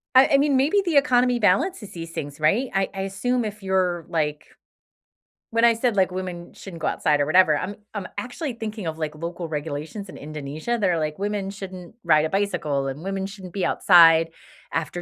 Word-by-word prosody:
I 260 +2 +8
I - - +7
mean, 285 -1 +3
maybe 300 +10 +3
the 340 -5 0
economy 250 -3 +4
balances 220 - +1
these 165 -1 -7
things, 145 -3 -6
right? 205 +13 +2
I 195 0 +1
I 195 - -4
assume 235 +6 -1
if 210 -1 -6
you're 185 -3 0
like 150 -2 -2 1.0
when 230 0 +1
I 235 -1 +6
said, 230 -1 0
like, 190 -2 +2
women 180 -2 -6
shouldn't 170 -5 -10
go - - 0
outside 150 -2 +1
or - - +2
whatever, 155 -1 +5
I'm 200 +6 -4 0.2
I'm 205 -3 -4
actually 255 +4 -4
thinking 220 -3 -6
of, 160 -1 -4
like, 155 -1 -3
local 170 +2 -5
regulations 155 +6 -5
in - - -10
Indonesia. 155 +9 -4
They're 180 -5 +1
like 155 -1 -2
women 205 -1 -2
shouldn't 190 -2 -9
ride 155 -3 +4
a - - -2
bicycle 170 -8 -1
and 135 +3 -5
women 195 0 -3
shouldn't 195 -3 -9
be 195 -3 -1
outside 165 -3 +6 0.4
after 165 +2 -2
185 Hz, 195 wpm, -24 LUFS, 160-215 Hz, 1.0 s, I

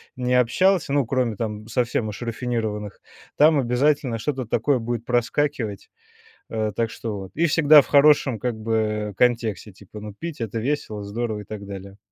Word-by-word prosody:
ни 125 0 -2
общался, 140 +6 +3
ну, 140 -5 +2
кроме 125 -4 0
там 110 -1 -4
совсем 115 -1 -1
уж 105 +3 -7
рафинированных, 115 -3 -3 0.3
там 155 +1 +5
обязательно 130 -1 +1
что-то 130 +1 -2
такое 125 +5 +1
будет 120 0 -4
проскакивать, 120 -3 -1 0.6
э, 110 -1 -2
так 115 0 -1
что 110 -3 -5
вот. 95 0 -9
И 165 - +1
всегда 150 -2 +6
в - - -13
хорошем 140 -4 +4
как 125 -2 -2
бы 110 -1 -1
контексте, 115 -4 +1
типа, 100 +2 -12
ну, 105 -1 -8
пить- 165 -5 -6
это 115 0 -3
весело, 110 -4 -2
здорово 110 +1 -3
и - - -9
так 100 -1 -8
далее. 100 0 -9
115 Hz, 170 wpm, -23 LUFS, 105-130 Hz, 0.6 s, всегда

